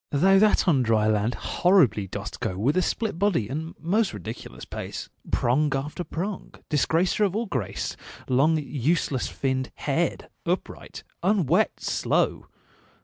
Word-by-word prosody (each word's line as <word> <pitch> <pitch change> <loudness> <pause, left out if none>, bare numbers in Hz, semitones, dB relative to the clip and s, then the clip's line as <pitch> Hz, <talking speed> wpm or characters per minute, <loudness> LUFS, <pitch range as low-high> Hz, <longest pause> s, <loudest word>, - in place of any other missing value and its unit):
Thou 190 +7 +4
that 210 -1 +4
on 145 -7 +4
dry 110 -3 +2
land 110 +2 +1
horribly 140 - +3
dost - - -6
go 90 - -2
With 125 +9 +1
a 185 - +3
split 205 -1 -2
body 190 - +2
and 160 +7 -5
most 195 - +1
ridiculous 95 - -8
pace, - - -6 0.2
Prong 140 +5 +2
after 150 +6 -3
prong, 190 +4 -5
disgracer 165 - +2
of 200 -2 +1
all 230 +2 0
grace, 115 - -3 0.3
Long 145 +6 +3
useless 145 -1 0
finned, 130 -1 -2
haired, - - -1 0.2
upright, - - -4 0.2
unwet, 190 -5 +2
slow! - - 0
150 Hz, 140 wpm, -25 LUFS, 125-185 Hz, 0.3 s, Thou